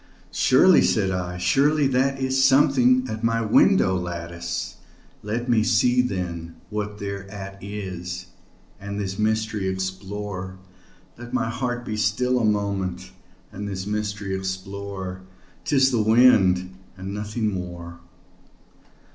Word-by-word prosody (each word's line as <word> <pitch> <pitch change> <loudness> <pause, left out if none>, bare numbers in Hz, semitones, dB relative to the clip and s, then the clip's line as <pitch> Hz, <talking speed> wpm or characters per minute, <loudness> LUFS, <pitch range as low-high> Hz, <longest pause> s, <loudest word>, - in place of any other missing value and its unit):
"Surely," - - +5
said 95 -3 +2
I, 90 -1 -3
"surely 145 +9 +3
that 135 +1 +1
is 130 0 +1
something 130 -2 +4
at 110 -1 -5
my 115 0 +1
window 95 -3 +4
lattice; 85 -1 -4 0.4
Let 115 +4 -3
me 120 -3 +3
see, 125 +2 +3
then, 90 -7 -4 0.2
what 105 0 -3
thereat 100 0 -7
is, 95 -3 -6 0.5
and 100 +1 -5
this 95 -1 -4
mystery 110 -2 0
explore 95 0 -4 0.6
Let 120 0 -9
my 115 - 0
heart 125 0 -3
be 110 - -3
still 125 +4 +1
a - - -1
moment, 100 -3 -1 0.4
and 100 +2 -6
this 95 -1 -4
mystery 105 -2 -3
explore; 95 0 -5 0.4
'Tis 135 -2 +3
the 120 -3 +2
wind 100 -5 +4 0.2
and 95 +1 -6
nothing 105 +1 -2
more." 85 -2 -7
100 Hz, 120 wpm, -24 LUFS, 95-115 Hz, 0.6 s, Surely